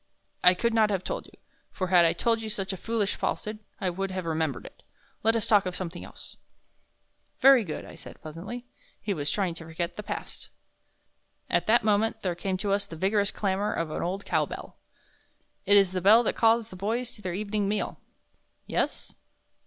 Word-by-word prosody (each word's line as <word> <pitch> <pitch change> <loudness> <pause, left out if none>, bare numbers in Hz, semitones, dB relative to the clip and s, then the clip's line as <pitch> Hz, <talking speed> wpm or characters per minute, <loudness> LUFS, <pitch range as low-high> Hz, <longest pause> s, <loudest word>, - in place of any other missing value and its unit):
"I 180 0 +7
could 235 +5 0
not 220 -2 +4
have 195 -3 -1
told - - -4
you, - - -19 0.4
for 185 -2 -3
had 175 -2 +6
I 165 - +4
told 230 -1 +1
you 220 - -5
such 195 -2 -3
a - - -3
foolish 215 +1 -1
falsehood 215 0 -3 0.2
I 185 -2 0
would 195 +2 -3
have 185 -1 -4
remembered 160 -4 -1
it. - - -13 0.4
Let 225 +1 +3
us 225 - 0
talk 210 -5 +4
of 180 - -4
something 180 -1 -5
else." - - -12 1.0
"Very 270 -3 +7
good," 160 -6 -5
I - - -11
said, - - -11
pleasantly. 180 +11 -7 0.3
He 210 - -2
was 145 -4 -1
trying 190 -4 0
to 165 - -9
forget 165 +2 -4
the - - -3
past. - - -7 1.0
At - - +2
that 230 +1 +5
moment 215 +1 +1
there 180 -2 0
came 185 +2 -2
to 200 +1 -2
us 200 0 0
the 165 - -8
vigorous 200 +4 +2
clamor 200 +1 -1
of 165 -2 -2
an - - -3
old 190 +3 -3
cow - - +1
bell. - - -8 0.9
"It 205 - +7
is 195 -2 +5
the 185 -1 -2
bell 215 +6 +7
that - - 0
calls 225 0 +3
the - - -10
boys 225 +6 -2
to 210 - -13
their 180 -3 -3
evening 205 0 -1
meal." 205 +1 -2 0.7
"Yes?" - - -2
200 Hz, 200 wpm, -28 LUFS, 180-215 Hz, 1.0 s, I